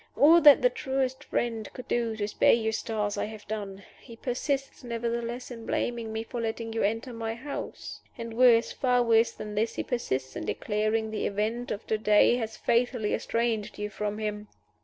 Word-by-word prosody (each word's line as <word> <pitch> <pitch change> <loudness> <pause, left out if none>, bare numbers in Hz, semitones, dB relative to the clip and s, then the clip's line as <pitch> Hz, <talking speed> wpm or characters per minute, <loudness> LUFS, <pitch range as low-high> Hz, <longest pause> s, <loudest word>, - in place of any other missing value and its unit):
All 330 +4 +7
that 295 - +8
the - - +5
truest 265 -1 -2
friend 225 -3 -2
could 255 - -9
do 230 -2 0
to 205 -1 -2
spare 210 - +4
Eustace 220 -2 -1
I - - 0
have 215 -1 -10
done. 200 -2 -5 0.2
He 235 - -12
persists, 270 +3 -3
nevertheless, 235 +1 -3
in 230 -2 -8
blaming 235 -2 -2
me 220 0 -3
for 240 +1 -5
letting 225 0 -3
you 225 - -1
enter 225 +5 -1
my 225 0 -3
house. 280 +4 -7 0.2
And 230 -1 -6
worse, 235 -1 +5
far 250 -2 +2
worse 230 0 +4
than 210 0 -7
this, 220 +2 0
he - - -2
persists 130 - -2
in - - -4
declaring 215 +1 -1
the 215 - -1
event 220 +4 -2
of 205 - -4
to 220 - -1
day 210 +3 +5
has 225 -2 -4
fatally 235 -2 +1
estranged 230 -3 -1
you 210 0 -4
from 210 0 -3
him. 210 -1 -4
230 Hz, 185 wpm, -28 LUFS, 215-240 Hz, 0.2 s, that